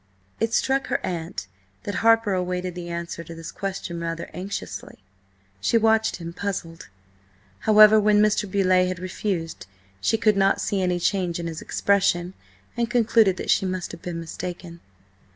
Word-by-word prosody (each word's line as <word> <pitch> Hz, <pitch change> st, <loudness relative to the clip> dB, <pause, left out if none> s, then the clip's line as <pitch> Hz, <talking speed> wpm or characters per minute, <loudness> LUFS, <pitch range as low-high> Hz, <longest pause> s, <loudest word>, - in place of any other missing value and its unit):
It 225 Hz, 0 st, 0 dB
struck 265 Hz, +3 st, +1 dB
her -, -, 0 dB
aunt 170 Hz, -, -4 dB, 0.4 s
that 205 Hz, -, -4 dB
Harper 225 Hz, -2 st, +4 dB
awaited 180 Hz, 0 st, -2 dB
the 175 Hz, 0 st, -7 dB
answer 170 Hz, 0 st, -5 dB
to 165 Hz, 0 st, -10 dB
this 165 Hz, 0 st, -8 dB
question 190 Hz, -3 st, -5 dB
rather 165 Hz, 0 st, -4 dB
anxiously. 180 Hz, -, -6 dB, 0.6 s
She 230 Hz, -, +2 dB
watched 220 Hz, 0 st, +3 dB
him, 170 Hz, -1 st, -7 dB
puzzled. 175 Hz, -4 st, -5 dB, 0.7 s
However, 215 Hz, 0 st, +7 dB
when 210 Hz, 0 st, +4 dB
Mr. 210 Hz, -1 st, +2 dB
Beauleigh 185 Hz, -1 st, +3 dB
had 185 Hz, 0 st, -3 dB
refused 175 Hz, -, -4 dB, 0.3 s
she 225 Hz, -, +2 dB
could 215 Hz, -2 st, +3 dB
not 195 Hz, 0 st, +3 dB
see 200 Hz, -2 st, -1 dB
any 180 Hz, -1 st, 0 dB
change 175 Hz, -2 st, 0 dB
in 170 Hz, -, -4 dB
his 165 Hz, -1 st, -5 dB
expression, 190 Hz, -3 st, +1 dB, 0.4 s
and 235 Hz, -1 st, -1 dB
concluded 220 Hz, -4 st, +3 dB
that -, -, -1 dB
she 190 Hz, -, +2 dB
must 185 Hz, -1 st, -3 dB
have -, -, -10 dB
been 175 Hz, -2 st, -5 dB
mistaken. 170 Hz, +1 st, -7 dB
185 Hz, 160 wpm, -24 LUFS, 170-210 Hz, 0.7 s, However